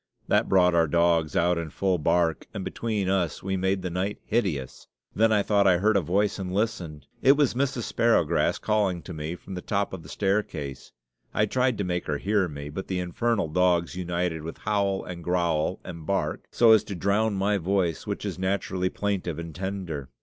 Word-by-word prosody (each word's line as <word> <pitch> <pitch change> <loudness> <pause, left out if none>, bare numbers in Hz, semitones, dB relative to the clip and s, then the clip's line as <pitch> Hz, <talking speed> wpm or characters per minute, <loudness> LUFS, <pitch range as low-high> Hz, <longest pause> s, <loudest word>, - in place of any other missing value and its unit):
That - - +2
brought 90 -2 +4
our 85 -1 +4
dogs 85 -1 +2
out 85 0 +2
in 85 -2 -4
full 95 +2 0
bark, 85 0 +1
and 95 - -4
between 110 -4 -2
us 95 -5 0
we 95 0 -1
made 95 0 0
night 90 +3 -2
hideous. 90 - -2 0.3
Then 110 +1 +4
I 105 -2 +3
thought 100 -1 +3
I 90 -2 +5
heard 105 +4 +2
a 100 - +4
voice 100 +6 0
and 90 -1 -4
listened 90 - -2 0.2
it 135 - +7
was 145 -2 +2
Mrs. 130 -1 -1
Sparrowgrass 115 -10 +2
calling 100 -5 0
to 90 - -8
me 80 +2 -4
from 95 - -10
the 90 - -5
top 100 0 -1
of 95 - -6
the - - -13
staircase. 95 -9 -2 0.4
I 105 - +3
tried 125 +2 +1
to 100 - -1
make 90 -1 -2
her 75 - 0
hear 100 +2 +1
me, 70 -2 -7
but 95 +6 -6
the 95 - -2
infernal 95 +2 0
dogs 90 +1 +2
united 90 -2 -2
with 80 +2 -7
howl, 100 -2 0
and 85 -2 -7
growl, 85 -1 0
and 85 -1 -8
bark, 95 +5 -2
so 115 -2 +5
as 110 - +6
to 100 - -5
drown 100 +4 +1
my 100 +1 +1
voice, 90 -2 0
which - - -3
is - - -4
naturally 95 -1 -1
plaintive 95 -6 -2
and 85 -1 -6
tender. 90 -6 -4
95 Hz, 200 wpm, -26 LUFS, 85-100 Hz, 0.4 s, it